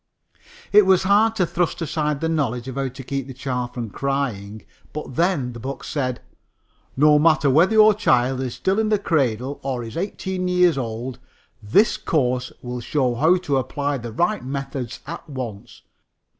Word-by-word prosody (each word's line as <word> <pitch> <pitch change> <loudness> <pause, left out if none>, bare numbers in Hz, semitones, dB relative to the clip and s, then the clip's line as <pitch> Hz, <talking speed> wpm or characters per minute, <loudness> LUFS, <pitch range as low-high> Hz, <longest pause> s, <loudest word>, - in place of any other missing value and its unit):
It 210 -1 +6
was 190 -1 +4
hard 210 +4 +3
to 190 -5 +2
thrust 175 +1 -1
aside 150 -3 -1
the 165 - 0
knowledge 130 -7 -1
of 130 - -5
how 135 +1 -2
to 130 +1 -9
keep 135 +1 -4
the 130 - -9
child 125 -2 -3
from 115 -4 -5
crying. 115 -7 -3 0.3
But, 150 -4 -6
then, 165 -8 +1
the 120 - -8
book 135 +4 -6
said: 130 -4 -3 0.8
"No 150 +1 +6
matter 155 -3 +4
whether 170 +10 +4
your 215 0 +7
child 130 - +2
is 125 -3 -4
still 190 +3 0
in 220 -1 +1
the 215 - +3
cradle 135 - -1
or 130 -3 -3
is 115 -1 -8
eighteen 190 0 -3
years 180 -2 +4
old, 120 0 -4 0.4
this 155 - +3
course 125 -4 0
will 125 0 -5
show 130 0 0
how 160 +9 +3
to 140 -2 +1
apply 140 +2 -2
the 115 -1 -7
right 175 - 0
methods 135 -2 -5
at 170 0 -8
once. 120 -7 -7
140 Hz, 175 wpm, -22 LUFS, 125-170 Hz, 0.8 s, your